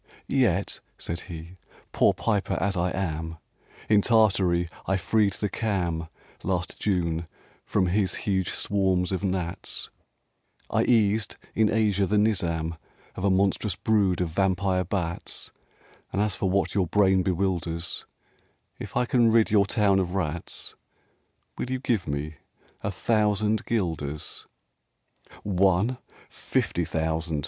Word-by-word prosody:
) - - -40
"Yet," 100 -8 +1 0.2
said 85 +1 -4
he, 85 +2 -8 0.3
"poor - - +4
piper 100 -3 0
as 100 +1 0
I 90 0 +1
am, 80 -3 -3 0.5
In 105 -1 +5
Tartary 95 -6 +3 0.2
I 95 - +2
freed 100 +2 +2
the 105 - -2
Cham, 90 -6 -1 0.3
Last 90 -1 -2
June, 85 -4 0 0.4
from 95 - +2
his 95 +1 +1
huge 95 -3 +1
swarms 95 -3 +1
of 95 +1 -2
gnats; 90 -3 -3 0.8
I - - +2
eased 110 -2 +2 0.2
in 110 -1 +3
Asia 105 -3 +2
the 105 - +2
Nizam 85 -6 +1 0.4
Of 95 - -5
a 100 - +3
monstrous 95 0 +1
brood 100 -5 +2
of 90 - 0
vampire 95 +1 +1
bats; 85 -2 -3 0.6
And 95 - -1
as 105 -1 +1
for 95 - -1
what 95 +1 +1
your 95 -3 +1
brain 95 0 +4
bewilders, 90 -2 -2 0.7
If - - -5
I 125 - +3
can 120 -2 +4
rid 115 -1 +4
your 100 -2 +4
town 100 -3 +3
of 90 0 -2
rats, 85 -3 -2 0.9
Will - - -2
you 130 - 0
give 115 -9 0
me 75 +1 -3 0.4
a - - -2
thousand 105 +1 +1
guilders?" 80 -9 -3 1.0
"One? 100 +5 +2 0.3
fifty - - -1
thousand!" 80 0 -1
95 Hz, 135 wpm, -26 LUFS, 85-105 Hz, 1.0 s, In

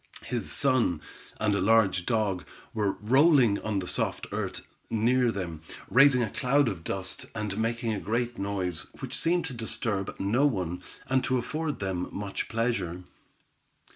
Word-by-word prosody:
His 120 -2 -3
son, 130 - +2 0.4
and 105 -1 +2
a 100 - +1
large 95 -3 +3
dog, 105 -6 +1 0.3
were 105 -3 +1
rolling 130 -1 +4
about - - -7
on 105 - 0
the 90 -2 -2
soft - - -1
earth, - - -3 0.2
near 120 +2 +3
them, 85 -6 -5 0.3
raising 125 +2 +6
a 110 - -1
cloud 140 +2 +2
of 95 -7 -3
dust, 95 +1 -4
and 105 -2 -2
making 115 0 0
a 105 - -2
great 120 +4 -2
noise, 95 -5 -2
which - - -4
seemed 170 0 +1
to 155 - -5
disturb 110 -4 -3
no 120 +9 +3
one, 90 - -2 0.3
and 130 0 +2
to 130 - +2
afford 155 +5 -2
them 95 -2 -2
much 100 -1 -4
pleasure. 115 -7 -1
110 Hz, 160 wpm, -28 LUFS, 95-125 Hz, 0.4 s, raising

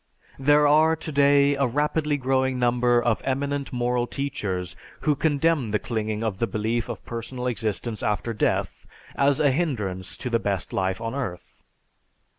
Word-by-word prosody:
There 145 +2 +4
are 155 +2 +5
today 145 -2 +3
a 140 -1 +1
rapidly 150 +3 0
growing 130 -1 +1
number 120 0 +3
of 120 -2 0
eminent 140 +1 -2
moral 120 0 0
teachers 95 - -3 0.3
who 150 - +2
condemn 145 -3 +1
the 105 - +1
clinging 110 -1 -3
to 110 -1 0
the 100 +4 -2
belief 110 +2 -2
of - - -6
personal 120 +2 -5
existence 110 -2 -2
after 105 +2 -1
death 110 - -1 0.3
as 140 0 +3
a 145 -2 +4
hindrance 105 - -2
to 125 - -5
the 115 - +2
best 100 -4 -2
life 95 +1 0
on 115 0 -4
earth. 120 -11 -6
125 Hz, 155 wpm, -25 LUFS, 110-140 Hz, 0.3 s, are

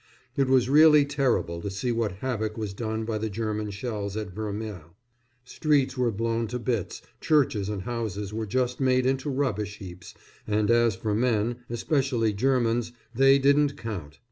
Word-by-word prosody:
It 135 -1 +2
was 130 -2 +3
really 150 +1 +7
terrible 125 - 0
to 100 - -4
see 100 +6 -2
what 115 -3 0
havoc 110 -4 -2
was 105 -3 -4
done 110 +1 -3
by 110 -1 -2
the 110 +1 -2
German 105 0 -3
shells 100 -1 -4
at 105 -3 -4
Vermelles 105 -6 -6 0.5
streets 140 -1 +1
were 125 -2 +1
blown 115 +2 -1
to 125 +3 -3
bits, 115 -5 -3 0.2
churches 125 -10 +2
and 100 -3 -4
houses 105 -3 -4
were 110 0 -3
just 125 +3 -1
made 130 -1 +2
into 135 +2 0
rubbish 105 -7 -2
heaps, 90 -2 -10 0.3
and 105 +1 +1
as 120 -3 +3
for 105 +2 -2
men, 115 0 +1
especially 120 -2 0
Germans, 120 0 +1 0.2
they 135 +2 +5
didn't 140 +1 +3
count. 90 - -6
115 Hz, 165 wpm, -26 LUFS, 105-130 Hz, 0.5 s, really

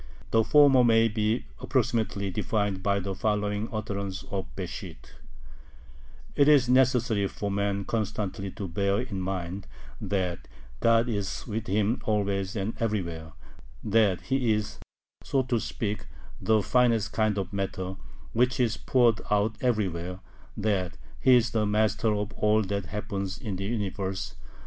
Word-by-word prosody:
The 115 0 +4
former 135 +1 +6
may 115 -1 +5
be 110 +2 0
approximately 115 -6 0
defined 100 0 -1
by 100 +1 +1
the 95 0 -3
following 105 +1 -1
utterances 100 -3 -4
of 95 -1 -2
Besht: - - -6 1.4
It 140 - +4
is 145 -4 +6
necessary 125 -5 +3
for 100 +1 -4
man 100 0 -1
constantly 105 -3 -2
to 95 +1 -6
bear 100 +3 0
in 110 -7 -4
mind 95 0 -4 0.3
that 90 -4 -2 0.3
God 115 +1 +4
is 100 -5 -3
with 110 0 -4
him 105 +4 +1
always 100 -2 0
and 105 +2 -2
everywhere; 85 -8 -2 0.5
that 105 -3 +3
He 130 -4 +1
is, 105 0 -3 0.4
so 135 -2 +1
to 125 -2 0
speak, 105 -1 -3 0.3
the 110 -2 +3
finest 115 -2 +2
kind 110 -2 +1
of 95 0 -3
matter, 95 -1 -3 0.4
which 125 +3 +2
is 115 -2 +2
poured 120 -3 +3
out 105 +1 +2
everywhere; 90 -7 -1 0.4
that 100 -5 -1 0.2
He 130 -1 +6
is 120 0 +3
the 110 -2 +1
master 110 +1 +2
of 105 0 -3
all 105 +1 +2
that 100 -1 -3
happens 100 -2 -4
in 105 -5 -4
the 95 +1 -4
Universe.... 100 -3 -3
105 Hz, 140 wpm, -27 LUFS, 100-115 Hz, 1.4 s, former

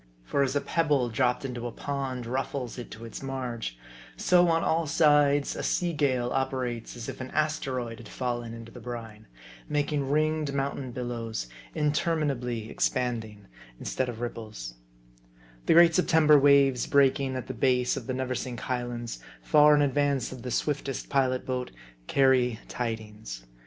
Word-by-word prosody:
For 100 - 0
as 135 0 +1
a 145 - +2
pebble 145 -7 +1
dropped 125 +3 +1
into 120 -2 -4
a - - -5
pond 135 -2 -4
ruffles 130 0 -3
it 120 - -7
to 115 +2 -9
its 115 - -8
marge; 125 - -4 0.4
so, 180 -1 +4
on 165 0 +2
all 165 0 +1
sides, 145 -2 +4
a - - -4
sea 175 -1 0
gale 130 -5 +1
operates 130 -4 -2
as 115 - -6
if 130 0 -6
an 130 - -5
asteroid 130 -6 -1
had 115 -3 -11
fallen 120 -2 -3
into 115 0 -10
the - - -10
brine; 115 -3 -8 0.4
making 145 -2 0
ringed 155 -1 +1
mountain 135 -1 -2
billows? 120 - -4 0.3
intermina 150 0 +1
bly 120 -3 -4
expanding, 110 -4 -2 0.3
instead 130 -1 -2
of 120 -1 -6
ripples. 110 - -6 0.9
The - - +6
great 170 0 +7
September 160 -4 +5
waves 140 -3 +4
breaking 135 -1 +3
at 130 - -4
the 130 - -5
base 125 +1 +2
of - - -6
the 130 - -1
Neversink 130 -2 -3
Highlands, 120 -2 -3 0.2
far 150 -1 +6
in 145 - +4
advance 140 -2 +1
of 130 -2 -8
the 125 - -5
swiftest 140 +1 -2
pilot 130 -2 +1
boat, 125 -1 -2 0.4
carry 130 -4 +3
tidings. 105 - -5
130 Hz, 155 wpm, -28 LUFS, 120-145 Hz, 0.9 s, great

